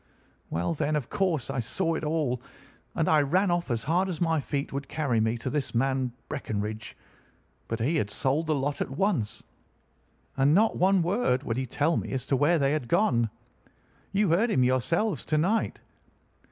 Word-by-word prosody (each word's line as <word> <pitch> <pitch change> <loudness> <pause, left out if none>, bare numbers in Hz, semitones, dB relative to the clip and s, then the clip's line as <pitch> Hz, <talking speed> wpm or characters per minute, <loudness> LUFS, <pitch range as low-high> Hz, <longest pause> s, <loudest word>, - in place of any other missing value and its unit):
"Well, 85 - -1
then, 155 0 -1
of 145 -5 -3
course 170 -9 0
I 135 - -2
saw 165 - 0
it 160 - -3
all, 150 -6 0 0.5
and 165 -3 +1
I 155 -1 +5
ran 180 +7 +2
off 175 -2 -1
as 115 -2 -1
hard 180 +5 +1
as 170 -4 -4
my 165 -2 +2
feet 140 -1 -3
would 140 0 -4
carry 140 -8 0
me 110 +2 +1
to 115 - -4
this 145 -5 -2
man 130 0 +1 0.2
Breckinridge; 110 -6 -4 0.7
but 115 - -3
he 145 +9 +1
had 105 -8 0
sold 135 +9 0
the 155 - +2
lot 140 +1 -2
at - - -1
once, 140 - -1 0.9
and 135 +3 +4
not 220 +3 +4
one 190 -1 +3
word 170 - +1
would 115 -4 -2
he 130 0 -2
tell 150 +7 +1
me - - -3
as 130 -1 -2
to 135 - +1
where 145 +6 +3
they 140 -2 +2
had 150 -5 -1
gone. 120 - +2 0.8
You 200 0 +2
heard 195 +9 +3
him 130 - +3
yourselves 165 - +1
to 155 - +1
night. 195 +9 +1
145 Hz, 190 wpm, -27 LUFS, 125-170 Hz, 0.9 s, I